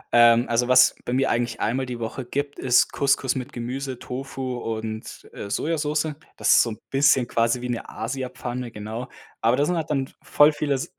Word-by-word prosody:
Ähm, 120 0 +6
also, 120 +1 +1
was 130 0 +6
bei - - -3
mir 135 +1 +2
eigentlich 120 -1 -1
einmal 130 +3 -1
die 125 -1 -5
Woche 115 +3 -4
gibt, 140 +3 -4
ist 125 -2 +3
Couscous 140 -2 +1
mit 130 +2 -5
Gemüse, 130 +1 -4
Tofu 130 0 -5
und, 110 -1 -5
äh, 100 - -7
Sojasoße. 150 +2 -1 0.2
Das - - +2
ist - - +7
so 120 - 0
'n 110 - -6
bisschen 135 -2 +4
quasi 115 +1 +1
wie 125 - -4
'ne 120 -1 -4
Asiapfanne, 125 0 -5
genau. 110 +3 -6 0.3
Aber 115 +3 +3
da 145 - +3
sind 180 - 0
halt 160 -2 -3
dann 135 -3 0
v - - -21
voll 150 +1 +5
viele 145 -2 0
S 130 - -2
125 Hz, 200 wpm, -24 LUFS, 120-135 Hz, 0.3 s, ist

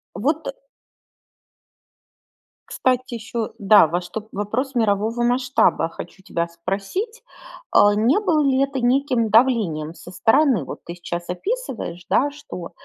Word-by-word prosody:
Вот, 300 - -1
э - - -2 2.2
кстати 255 -1 0
ещё, 230 0 -4
да, 200 -3 +6
во 175 +3 -1
что 215 +4 -7
вопрос 220 +7 -2
мирового 225 +1 +1
масштаба 245 -8 +2
хочу 185 +3 -10
тебя 170 -3 -2
спросить. 195 - -4 0.5
Э, - - +8 0.2
не 235 - +3
было 340 -7 +2
ли 270 -1 +2
это 275 -1 -2
неким 250 -2 +1
давлением 205 -10 +2
со 175 - -12
стороны? 250 - +3
Вот - - -7
ты 170 - -8
сейчас 175 0 -6
описываешь, 215 - -4
да, 285 +2 +2
что 180 -12 -9
230 Hz, 130 wpm, -22 LUFS, 185-270 Hz, 2.2 s, Э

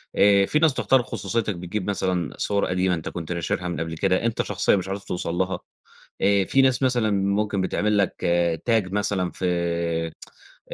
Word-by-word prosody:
آآ 100 -1 +5
في 150 - +1
ناس 160 -3 +4
تخترق 130 -1 +2
خصوصيتك 105 0 -2
بتجيب 90 +3 -4
مثلًا 90 -5 -1
صور 100 -1 0
قديمة 90 0 +1
أنت 80 - -5
كنت 85 -1 -6
ناشرها 85 +1 -2
من 85 - -3
قبل 80 0 -4
كده 95 +4 +1
أنت 115 -1 0
شخصيًا - - +1
مش 95 -2 -2
عارف 100 +1 -4
توصل 90 -3 -3
لها، 95 +1 -1 0.6
آآ 100 -1 +3
في 135 - +3
ناس 130 0 +2
مثلًا 120 -4 +2
ممكن 100 0 0
بتعمل 105 +3 0
لك 100 -3 +1 0.5
tag 110 -5 +2
مثلًا 100 -3 0
في 85 -2 -1 0.6
ف - - -3
95 Hz, 180 wpm, -24 LUFS, 90-105 Hz, 0.6 s, آآ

